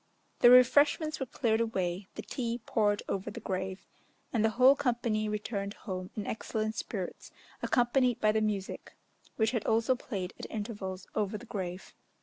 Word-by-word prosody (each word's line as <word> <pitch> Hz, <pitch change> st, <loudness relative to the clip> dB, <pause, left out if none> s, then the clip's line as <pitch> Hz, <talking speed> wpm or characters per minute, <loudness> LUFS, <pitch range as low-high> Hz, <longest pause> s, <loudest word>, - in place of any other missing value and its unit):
The 240 Hz, -, +8 dB
refreshments 285 Hz, +5 st, +5 dB
were 265 Hz, -, -3 dB
cleared 225 Hz, -1 st, +1 dB
away, 190 Hz, -4 st, -1 dB
the -, -, -6 dB
tea 235 Hz, -2 st, -3 dB
poured 205 Hz, -2 st, +1 dB
over 195 Hz, -1 st, -2 dB
the -, -, -7 dB
grave, 190 Hz, 0 st, -4 dB, 0.5 s
and 225 Hz, -3 st, +2 dB
the 220 Hz, -, +4 dB
whole 260 Hz, +2 st, +7 dB
company 235 Hz, -5 st, 0 dB
returned 210 Hz, -1 st, -3 dB
home 185 Hz, -3 st, -6 dB
in 210 Hz, -, -3 dB
excellent 220 Hz, 0 st, -2 dB
spirits 195 Hz, -4 st, -5 dB, 0.3 s
accompanied 245 Hz, 0 st, +2 dB
by 215 Hz, -, +4 dB
the 220 Hz, 0 st, +1 dB
music, 205 Hz, -3 st, -3 dB, 0.4 s
which 220 Hz, 0 st, +2 dB
had 230 Hz, -4 st, -1 dB
also 225 Hz, +3 st, +3 dB
played 200 Hz, -7 st, -5 dB
at -, -, -7 dB
intervals 205 Hz, -4 st, -5 dB
over 210 Hz, 0 st, -1 dB
the 240 Hz, -, -11 dB
grave. 185 Hz, -4 st, -5 dB
220 Hz, 160 wpm, -31 LUFS, 195-240 Hz, 0.5 s, The